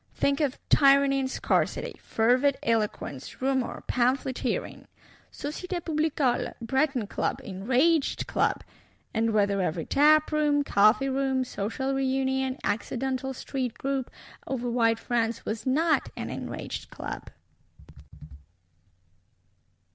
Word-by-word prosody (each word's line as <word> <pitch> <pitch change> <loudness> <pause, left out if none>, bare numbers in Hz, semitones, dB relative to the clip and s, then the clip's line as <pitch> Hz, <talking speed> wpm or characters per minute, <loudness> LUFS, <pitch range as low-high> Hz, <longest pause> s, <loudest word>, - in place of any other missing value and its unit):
Think 280 0 +1
of 285 -3 0
Tyranny 275 -1 +5
and 260 -1 -1
Scarcity; - - 0
Fervid 255 +5 +2
eloquence, 210 - -2
Rumour, 265 -1 -1
Pamphleteering; 260 - -1 0.4
Societé 350 +5 -4
Publicole, 305 -5 0
Breton 265 0 0
Club, - - -2
Enraged 260 - +1
Club;—and 225 0 -2
whether 200 -2 +2
every 165 -2 -2
tap 305 +2 +4
room, 295 -1 +2
coffee 215 +3 +4
room, 265 -1 0
social 255 +3 -3
reunion, 265 0 0
accidental 260 +5 -2
street 250 -3 -4
group, 270 -2 -2 0.4
over 250 -2 -2
wide 230 -1 +3
France, 230 -1 -1
was 220 +4 -4
not 305 +2 +2
an - - -4
Enraged - - -6
Club! - - -7
265 Hz, 100 wpm, -27 LUFS, 230-280 Hz, 0.4 s, Tyranny